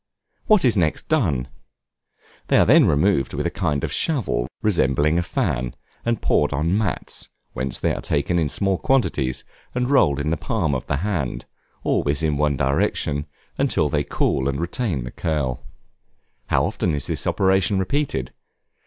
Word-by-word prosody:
What 210 -8 +5
is 120 - +4
next 85 -6 0
done? 85 - +1 1.0
They - - +4
are - - +5
then - - +6
removed 75 -1 +2
with - - -2
a - - 0
kind 70 -2 -1
of - - -2
shovel 120 - 0 0.2
resembling 75 -4 +2
a - - +2
fan, 60 -7 -2 0.3
and 115 -1 0
poured 75 - +2
on 80 +6 0
mats, 105 -5 -3 0.2
whence 65 0 -2
they - - 0
are - - -4
taken 85 +4 0
in 80 -3 0
small 95 +3 0
quantities, 75 - 0 0.3
and 125 +2 0
rolled 75 - +4
in 75 +2 -1
the 85 - 0
palm 75 -1 -1
of 65 - -3
the 75 - 0
hand 85 -11 -2 0.4
always 75 +2 +1
in 75 -2 +1
one 75 -1 +1
direction, 75 +1 0 0.3
until 75 - +2
they 75 0 0
cool 70 -1 0
and 70 +1 -2
retain 85 - -2
the 60 - -7
curl. 65 -7 -2 0.8
How - - +2
often 85 -4 -1
is 70 - -3
this - - -3
operation 95 +1 +2
repeated? 95 - -1
75 Hz, 165 wpm, -22 LUFS, 70-95 Hz, 1.0 s, then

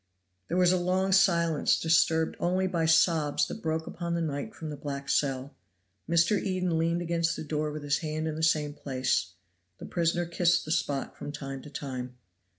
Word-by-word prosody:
There 175 - -1
was 180 -1 +5
a 185 - +3
long 185 +2 +1
silence, 170 -5 +3
disturbed 160 0 +2
only 185 +2 +1
by 170 -3 0
sobs 160 -2 +3
that 220 - -7
broke 160 0 -1
upon 170 0 -4
the 170 - -1
night 155 +6 -3
from 155 -2 -6
the - - -5
black 140 -1 -6
cell. 135 -1 0 0.5
Mr. 170 +4 +3
Eden 185 -4 0
leaned 170 +1 0
against 165 -1 0
the - - -5
door 150 0 -2
with 150 0 -6
his 140 -1 +1
hand 155 -1 -3
in 155 - -2
the 160 - -4
same 150 -2 +2
place; 130 - -1 0.4
the - - -9
prisoner 170 0 0
kissed 170 +1 +2
the 155 - -5
spot 140 -4 -1
from 145 - -6
time 135 -2 -6
to 150 - -11
time. 130 -3 -6
160 Hz, 190 wpm, -28 LUFS, 145-170 Hz, 0.5 s, was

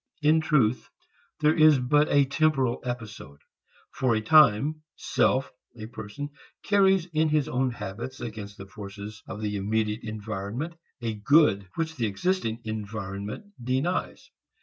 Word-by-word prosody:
In 155 +2 +5
truth, 130 -7 +1 0.5
there 150 +1 +5
is 155 -3 +6
but 145 +4 +2
a 140 -1 +4
temporal 135 -3 +1
episode. 110 - -6 0.5
For 125 -3 +1
a 110 - 0
time, 140 0 +6
a 155 0 -9 0.2
self, 130 0 +1 0.3
a 110 - -7
person, 110 +5 -7 0.3
carries 195 -3 +4
in 155 0 +2
his 150 -1 +1
own 130 -3 0
habits 115 +3 -6
against 105 -3 -7
the 95 - -8
forces 100 +1 -9
of 105 - -7
the 105 -1 -2
immediate 105 +2 -1
environment, 110 - -5 0.3
a 115 -1 -1
good 105 -3 +3
which 160 -1 -3
the 115 -3 0
existing 115 - -1
environment 105 - -5 0.2
denies. 135 +9 -2
120 Hz, 140 wpm, -27 LUFS, 105-150 Hz, 0.5 s, is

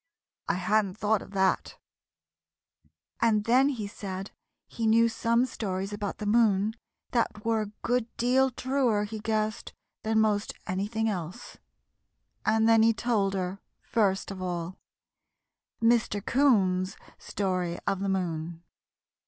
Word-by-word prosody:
I - - +1
hadn't 195 +1 +1
thought 215 -1 +1
of - - -11
that," 190 -1 +1 1.4
and 220 -3 +3
then 255 +5 +4
he 235 -7 -3
said 195 -1 -6 0.3
he 225 -1 -3
knew 230 +1 +5
some 230 +1 +1
stories 195 -4 -4
about 205 -1 -4
the 210 - -5
moon 210 -1 +3 0.4
that 225 -3 -1
were 225 -1 +2
a - - -2 0.2
good 245 -1 +1
deal 260 +2 +3
truer, 255 -4 0
he 215 +1 -5
guessed, 215 0 -2 0.3
than 220 0 +1
most 210 -1 +1
anything 210 +4 -1
else. 185 +2 -5 0.9
And 220 +1 +3
then 225 -1 +6
he 225 +1 +5
told 210 -5 0
her, 185 +1 -3 0.2
first 200 -4 0
of 190 -1 -7
all, 175 -1 -3 1.1
MR. 230 -3 +2
'COON'S 195 -9 +2 0.2
STORY 185 -3 -2
OF 195 - 0
THE 195 0 -1
MOON. 170 -3 -3
210 Hz, 130 wpm, -28 LUFS, 190-230 Hz, 1.4 s, then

